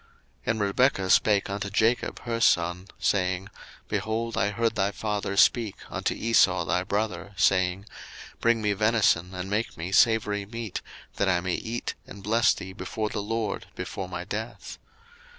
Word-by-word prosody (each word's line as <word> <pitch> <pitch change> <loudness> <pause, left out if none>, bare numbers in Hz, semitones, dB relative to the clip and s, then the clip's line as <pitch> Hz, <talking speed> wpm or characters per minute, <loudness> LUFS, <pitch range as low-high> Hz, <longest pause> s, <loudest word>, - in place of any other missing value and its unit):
01:027:006 - - -30 0.4
And 110 0 +1
Rebekah 100 -1 +2
spake 105 -2 +4
unto 100 0 -3
Jacob 110 +4 +1
her 115 -2 -3
son, 85 -1 +2
saying, 95 0 0 0.4
Behold, 110 +3 -2
I 100 - +1
heard 115 +2 0
thy 95 - +1
father 100 -1 -3
speak 115 -3 +4 0.2
unto - - -1
Esau 95 -6 +3
thy 90 +2 +1
brother, 100 0 -2
saying, 95 +1 +2 0.5
01:027:007 - - -38
Bring 115 -1 +3
me 105 -1 +2
venison, 100 -4 +2
and 90 +1 -4
make 105 +3 -2
me 85 +3 -5
savoury 105 -2 +3
meat, 115 -2 -5 0.4
that 100 - +2
I 90 -2 +3
may 90 0 -2
eat, 115 +5 -3
and 100 0 -11
bless 115 +3 +3
thee 95 0 -8
before 110 +1 -3
the 105 - -3
LORD 110 0 -3
before 95 -1 -5
my 90 -1 -4
death. 110 +5 -6
100 Hz, 165 wpm, -27 LUFS, 95-110 Hz, 0.5 s, spake